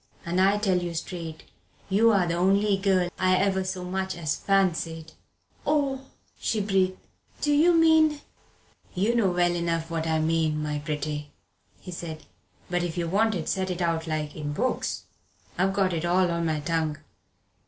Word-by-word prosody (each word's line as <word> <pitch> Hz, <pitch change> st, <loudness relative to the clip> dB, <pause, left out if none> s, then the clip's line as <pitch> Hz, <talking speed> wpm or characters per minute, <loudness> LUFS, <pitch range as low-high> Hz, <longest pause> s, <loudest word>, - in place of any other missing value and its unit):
And 175 Hz, +2 st, +1 dB
I 195 Hz, +2 st, +4 dB
tell 195 Hz, -4 st, +2 dB
you 175 Hz, -1 st, -4 dB
straight, 165 Hz, -1 st, -6 dB, 0.4 s
you're 200 Hz, -1 st, +4 dB
the 170 Hz, -, -1 dB
only 195 Hz, +4 st, +3 dB
girl 190 Hz, -2 st, +1 dB
I 185 Hz, 0 st, +3 dB
ever 190 Hz, 0 st, +1 dB
so 185 Hz, -1 st, -4 dB
much 190 Hz, 0 st, -3 dB
as 155 Hz, -4 st, -1 dB
fancied." 165 Hz, -5 st, 0 dB, 0.5 s
"Oh," 280 Hz, -3 st, +1 dB, 0.4 s
she 220 Hz, -, 0 dB
breathed, 190 Hz, -2 st, +1 dB, 0.4 s
"do 295 Hz, -, +1 dB
you 335 Hz, +4 st, +5 dB
mean 320 Hz, -2 st, +5 dB, 0.4 s
" -, -, -32 dB
"You 205 Hz, +6 st, +2 dB
know 230 Hz, -5 st, +3 dB
well 175 Hz, -1 st, +2 dB
enough 165 Hz, -1 st, -2 dB
what 165 Hz, -1 st, -2 dB
I 160 Hz, 0 st, +1 dB
mean, 155 Hz, -1 st, +1 dB
my 150 Hz, -1 st, -2 dB
pretty," 150 Hz, 0 st, -4 dB, 0.5 s
he 180 Hz, -, -9 dB
said; 165 Hz, -2 st, -7 dB, 0.4 s
"but 175 Hz, 0 st, 0 dB
if 175 Hz, 0 st, -3 dB
you 170 Hz, -1 st, -1 dB
want 215 Hz, +5 st, +2 dB
it 165 Hz, -, -4 dB
said 185 Hz, -2 st, -1 dB
out 165 Hz, -2 st, 0 dB
like 155 Hz, -1 st, -3 dB
in 145 Hz, -1 st, -4 dB
books, 250 Hz, +11 st, -1 dB, 0.5 s
I've 190 Hz, +2 st, +2 dB
got 195 Hz, -2 st, +1 dB
it 165 Hz, -1 st, -2 dB
all 175 Hz, +1 st, +2 dB
on 170 Hz, 0 st, -1 dB
my 155 Hz, -1 st, -1 dB
tongue. 160 Hz, 0 st, -1 dB
180 Hz, 170 wpm, -26 LUFS, 165-195 Hz, 0.5 s, you